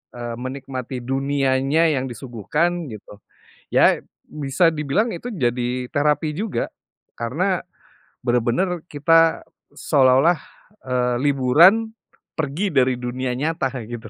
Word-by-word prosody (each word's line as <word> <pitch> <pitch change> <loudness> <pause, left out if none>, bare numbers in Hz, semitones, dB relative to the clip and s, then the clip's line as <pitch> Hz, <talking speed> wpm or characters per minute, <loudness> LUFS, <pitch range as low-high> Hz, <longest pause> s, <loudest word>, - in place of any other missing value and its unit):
eee, 120 -1 -5
menikmati 130 -1 -5
dunianya 135 +3 +1
yang 130 - -1
disuguhkan, 150 - -2
gitu. 105 -1 -11 0.6
Ya, - - +5 0.3
bisa 150 +3 +1
dibilang 150 - 0
itu 175 +8 -7
jadi 125 -3 -1
terapi 150 +1 +1
juga. 215 0 -2 0.5
Karena, 175 +11 -1 0.6
benar-benar 125 +9 +1
kita, 165 +2 +3 0.3
seolah-olah, 140 +4 +3 0.5
eee, 125 -1 +1
liburan, 155 - +4 0.5
pergi 160 +7 -1
dari 130 -1 +3
dunia 125 +1 -3
nyata, 150 0 -1
kaya 125 -5 -6
gitu. 120 -2 -7
135 Hz, 105 wpm, -22 LUFS, 125-165 Hz, 0.6 s, Ya